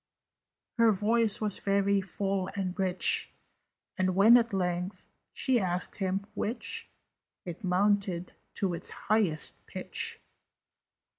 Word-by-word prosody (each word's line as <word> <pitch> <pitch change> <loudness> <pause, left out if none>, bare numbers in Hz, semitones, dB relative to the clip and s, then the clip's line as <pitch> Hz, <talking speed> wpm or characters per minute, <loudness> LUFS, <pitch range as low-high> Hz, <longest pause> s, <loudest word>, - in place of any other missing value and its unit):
Her 230 -1 +6
voice 215 +2 +2
was 210 -3 0
very 200 0 +2
full 195 0 -2
and 190 -2 -2
rich, 185 -1 +2 0.7
And, 185 -1 +1
when 215 +5 +7
at 235 -1 +3
length 180 0 -2 0.2
she 260 -3 +1
asked 180 -2 -3
him 195 0 -1
"Which?" 230 +4 -4 0.6
It 175 +1 -7
mounted 185 -1 +1 0.2
to 190 -3 -1
its 170 - -1
highest 195 -8 0
pitch. - - -4
195 Hz, 115 wpm, -29 LUFS, 185-210 Hz, 0.7 s, when